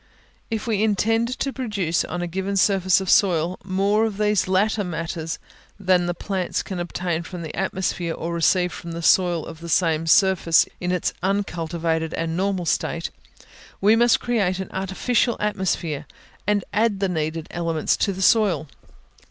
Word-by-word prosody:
If 220 Hz, -1 st, -3 dB
we 215 Hz, -4 st, 0 dB
intend 225 Hz, +2 st, +2 dB
to 275 Hz, -, -2 dB
produce 200 Hz, -10 st, -1 dB
on 175 Hz, 0 st, -4 dB
a -, -, -2 dB
given 190 Hz, +3 st, -2 dB
surface 190 Hz, -1 st, +3 dB
of 190 Hz, -, -5 dB
soil 180 Hz, -2 st, +3 dB
more 200 Hz, +3 st, +1 dB
of 210 Hz, -3 st, -6 dB
these 210 Hz, -2 st, +2 dB
latter 205 Hz, +3 st, +2 dB
matters 165 Hz, -2 st, -4 dB, 0.4 s
than 185 Hz, -2 st, +2 dB
the 175 Hz, -, -1 dB
plants 190 Hz, -1 st, -2 dB
can 185 Hz, -2 st, -5 dB
obtain 175 Hz, -1 st, -2 dB
from 170 Hz, +1 st, -7 dB
the 155 Hz, -, -6 dB
atmosphere 180 Hz, -3 st, -2 dB
or 170 Hz, +1 st, -4 dB
receive 180 Hz, +1 st, +2 dB
from 170 Hz, -1 st, -7 dB
the 170 Hz, 0 st, -5 dB
soil 175 Hz, -2 st, +3 dB
of 160 Hz, -, -9 dB
the 170 Hz, 0 st, -8 dB
same 165 Hz, -1 st, +2 dB
surface 185 Hz, -2 st, +4 dB
in 180 Hz, 0 st, -2 dB
its 180 Hz, -2 st, 0 dB
uncultivated 170 Hz, -4 st, -1 dB
and 165 Hz, 0 st, -2 dB
normal 190 Hz, -1 st, -1 dB
state, 165 Hz, +1 st, -1 dB, 0.7 s
we 210 Hz, +3 st, +5 dB
must 235 Hz, 0 st, +4 dB
create 205 Hz, -7 st, 0 dB
an 190 Hz, -1 st, -6 dB
artificial 195 Hz, +6 st, 0 dB
atmosphere, 175 Hz, -7 st, -2 dB, 0.4 s
and 205 Hz, -2 st, +2 dB
add 210 Hz, -1 st, +2 dB
the 195 Hz, -, +1 dB
needed 160 Hz, -2 st, -2 dB
elements 165 Hz, -2 st, 0 dB
to 200 Hz, -, +1 dB
the 190 Hz, 0 st, -3 dB
soil. 190 Hz, -8 st, +3 dB
185 Hz, 165 wpm, -23 LUFS, 170-200 Hz, 0.7 s, we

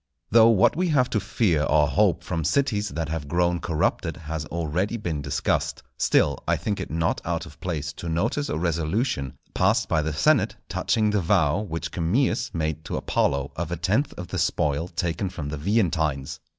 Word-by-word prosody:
Though 115 Hz, +1 st, +7 dB
what 105 Hz, -5 st, +4 dB
we 180 Hz, +3 st, +1 dB
have 135 Hz, -6 st, +2 dB
to 105 Hz, -, +2 dB
fear 100 Hz, -5 st, +1 dB
or 75 Hz, 0 st, +3 dB
hope -, -, +2 dB
from 80 Hz, -, -2 dB
cities 105 Hz, -, +1 dB
that 80 Hz, -2 st, -3 dB
have 80 Hz, -2 st, -3 dB
grown 85 Hz, +2 st, +1 dB
corrupted 85 Hz, +1 st, -1 dB
has 80 Hz, -1 st, -5 dB
already 85 Hz, +7 st, -1 dB
been 85 Hz, -8 st, -3 dB
discussed, -, -, -1 dB
still 70 Hz, -2 st, +2 dB
I -, -, +2 dB
think 105 Hz, -2 st, -2 dB
it -, -, -5 dB
not 80 Hz, +1 st, 0 dB
out -, -, -2 dB
of -, -, -14 dB
place 75 Hz, -4 st, -3 dB
to 85 Hz, -, -4 dB
notice 110 Hz, -, 0 dB
a -, -, -1 dB
resolution 85 Hz, -, -1 dB, 0.2 s
passed -, -, +2 dB
by 80 Hz, -, +2 dB
the 80 Hz, +1 st, -2 dB
senate 75 Hz, +1 st, +2 dB
touching 110 Hz, -2 st, +1 dB
the 105 Hz, -2 st, +1 dB
vow 85 Hz, -2 st, +2 dB
which 85 Hz, -6 st, -4 dB
Camillus 110 Hz, +9 st, 0 dB
made 80 Hz, -1 st, -2 dB
to -, -, -3 dB
Apollo 70 Hz, 0 st, 0 dB
of 85 Hz, 0 st, -4 dB
a 85 Hz, -, -2 dB
tenth 105 Hz, -, +1 dB
of 90 Hz, -1 st, -7 dB
the -, -, -2 dB
spoil 75 Hz, +3 st, 0 dB
taken 90 Hz, +3 st, -2 dB
from 75 Hz, -5 st, -5 dB
the 75 Hz, -, -4 dB
Veientines. 80 Hz, -7 st, 0 dB
85 Hz, 190 wpm, -25 LUFS, 80-105 Hz, 0.2 s, Though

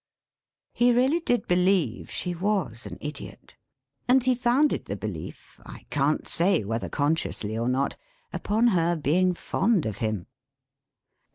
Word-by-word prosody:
He 245 Hz, +1 st, +4 dB
really 260 Hz, +7 st, +3 dB
did 245 Hz, -8 st, 0 dB
believe 180 Hz, -, +1 dB
she 180 Hz, -, -3 dB
was 175 Hz, -, -2 dB
an -, -, -8 dB
Idiot; 150 Hz, +1 st, -8 dB, 0.5 s
and 255 Hz, 0 st, +4 dB
he 255 Hz, 0 st, +3 dB
founded 250 Hz, +4 st, +2 dB
the -, -, -4 dB
belief, -, -, -8 dB
I -, -, -11 dB
can't 145 Hz, +1 st, 0 dB
say 175 Hz, -, +2 dB
whether 115 Hz, +3 st, -3 dB
consciously 145 Hz, -7 st, -1 dB
or 115 Hz, +2 st, -1 dB
not, 135 Hz, +2 st, 0 dB, 0.4 s
upon 225 Hz, +4 st, +2 dB
her 175 Hz, -4 st, +2 dB
being 175 Hz, +5 st, +2 dB
fond 195 Hz, 0 st, 0 dB
of 110 Hz, -2 st, -3 dB
him. 110 Hz, -5 st, -2 dB
175 Hz, 140 wpm, -26 LUFS, -, 0.5 s, He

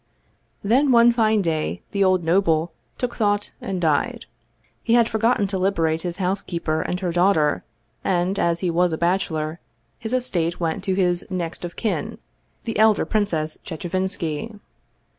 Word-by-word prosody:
Then 260 Hz, +7 st, +3 dB
one 235 Hz, 0 st, +6 dB
fine 220 Hz, -3 st, +2 dB
day 160 Hz, -2 st, -2 dB
the 200 Hz, -1 st, +1 dB
old 185 Hz, -2 st, +3 dB
noble 165 Hz, -1 st, +2 dB, 0.3 s
took 250 Hz, -1 st, -3 dB
thought 205 Hz, -2 st, 0 dB
and 190 Hz, -2 st, -3 dB
died. 155 Hz, -4 st, 0 dB, 0.6 s
He 230 Hz, -, +2 dB
had 235 Hz, -1 st, +5 dB
forgotten 225 Hz, -1 st, +1 dB
to 190 Hz, -1 st, -2 dB
liberate 165 Hz, -4 st, +1 dB
his 175 Hz, 0 st, -4 dB
housekeeper 180 Hz, -4 st, -1 dB
and 180 Hz, -, -2 dB
her 180 Hz, -2 st, -1 dB
daughter, 170 Hz, -4 st, +2 dB, 0.4 s
and, 185 Hz, +1 st, 0 dB
as 170 Hz, 0 st, +1 dB
he 180 Hz, -2 st, 0 dB
was 175 Hz, 0 st, +2 dB
a -, -, -1 dB
bachelor, 170 Hz, -3 st, -1 dB, 0.4 s
his 225 Hz, -1 st, -5 dB
estate 185 Hz, -10 st, 0 dB
went 165 Hz, +1 st, -2 dB
to 190 Hz, -2 st, +1 dB
his 180 Hz, -2 st, +1 dB
next 175 Hz, -3 st, -4 dB
of 175 Hz, -1 st, -6 dB
kin, 190 Hz, -10 st, -2 dB, 0.5 s
the 225 Hz, -2 st, -3 dB
elder 220 Hz, -1 st, +4 dB
Princess 165 Hz, -8 st, 0 dB
Chechevinski. 185 Hz, +2 st, -3 dB
185 Hz, 155 wpm, -23 LUFS, 165-205 Hz, 0.6 s, one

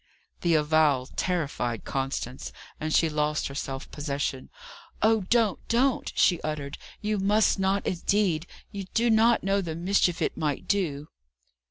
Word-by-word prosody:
The 170 Hz, -2 st, +3 dB
avowal 150 Hz, -3 st, +3 dB
terrified 145 Hz, -, -2 dB
Constance, 135 Hz, -1 st, -3 dB, 0.3 s
and 155 Hz, 0 st, -3 dB
she 165 Hz, -, +4 dB
lost 150 Hz, -1 st, -1 dB
her -, -, -8 dB
self 135 Hz, -1 st, -5 dB
possession. 140 Hz, -3 st, -3 dB, 0.5 s
"Oh 220 Hz, -2 st, +3 dB
don't! 230 Hz, -5 st, +3 dB
don't!" 250 Hz, +3 st, +1 dB
she 175 Hz, -3 st, +3 dB
uttered. 150 Hz, -2 st, -4 dB, 0.2 s
"You 210 Hz, -1 st, -1 dB
must 205 Hz, +1 st, +3 dB
not, 195 Hz, +1 st, +1 dB
indeed! 180 Hz, -2 st, 0 dB, 0.2 s
you 200 Hz, -1 st, -5 dB
do 235 Hz, 0 st, +3 dB
not 225 Hz, +1 st, +4 dB
know 195 Hz, +1 st, +1 dB
the 165 Hz, -4 st, -4 dB
mischief 180 Hz, 0 st, +1 dB
it -, -, -1 dB
might 150 Hz, -4 st, -2 dB
do." 155 Hz, -7 st, -1 dB
170 Hz, 145 wpm, -27 LUFS, 145-200 Hz, 0.5 s, she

